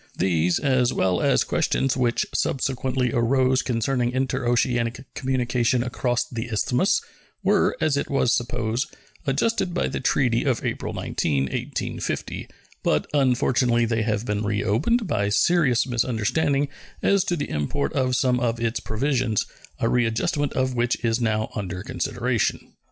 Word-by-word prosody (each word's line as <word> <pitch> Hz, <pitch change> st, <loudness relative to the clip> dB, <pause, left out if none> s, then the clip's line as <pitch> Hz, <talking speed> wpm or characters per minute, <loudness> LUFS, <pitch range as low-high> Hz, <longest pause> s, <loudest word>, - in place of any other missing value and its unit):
These, 85 Hz, -1 st, +2 dB
as 130 Hz, -3 st, +2 dB
well 90 Hz, -1 st, +1 dB
as -, -, +3 dB
questions 135 Hz, -1 st, 0 dB
which 120 Hz, -2 st, +1 dB
subsequently 130 Hz, -1 st, 0 dB
arose 130 Hz, +2 st, +2 dB
concerning 120 Hz, 0 st, 0 dB
interoceanic 125 Hz, -1 st, 0 dB
communication 125 Hz, -2 st, 0 dB
across 125 Hz, 0 st, -1 dB
the 115 Hz, -1 st, -5 dB
Isthmus, 125 Hz, -, +1 dB, 0.4 s
were, -, -, +2 dB
as 145 Hz, -3 st, +1 dB
it -, -, -2 dB
was 135 Hz, -3 st, +2 dB
supposed, 115 Hz, +2 st, -1 dB, 0.4 s
adjusted 175 Hz, +6 st, 0 dB
by -, -, +1 dB
the -, -, -3 dB
treaty 120 Hz, -4 st, +2 dB
of 130 Hz, -5 st, 0 dB
April -, -, -2 dB
19, 70 Hz, -4 st, -1 dB
1850, 65 Hz, -, -4 dB, 0.3 s
but, -, -, +1 dB
unfortunately, 125 Hz, -3 st, +2 dB
they 115 Hz, -1 st, 0 dB
have 110 Hz, 0 st, -1 dB
been 105 Hz, -2 st, -1 dB
reopened 110 Hz, -, +1 dB
by 100 Hz, -, 0 dB
serious 130 Hz, 0 st, +3 dB
misunderstanding 130 Hz, +4 st, 0 dB, 0.4 s
as 200 Hz, -2 st, +3 dB
to 175 Hz, -, 0 dB
the 145 Hz, -, -4 dB
import 75 Hz, -, -1 dB
of 130 Hz, -2 st, +1 dB
some 125 Hz, -1 st, +2 dB
or 120 Hz, -2 st, 0 dB
its 115 Hz, 0 st, -1 dB
provisions, 120 Hz, -1 st, 0 dB, 0.3 s
a -, -, 0 dB
readjustment 125 Hz, +6 st, +1 dB
of 130 Hz, 0 st, 0 dB
which 120 Hz, 0 st, +1 dB
is 115 Hz, +1 st, +1 dB
now 110 Hz, -1 st, 0 dB
under 90 Hz, -3 st, -4 dB
consideration. -, -, -2 dB
125 Hz, 140 wpm, -24 LUFS, 115-135 Hz, 0.4 s, as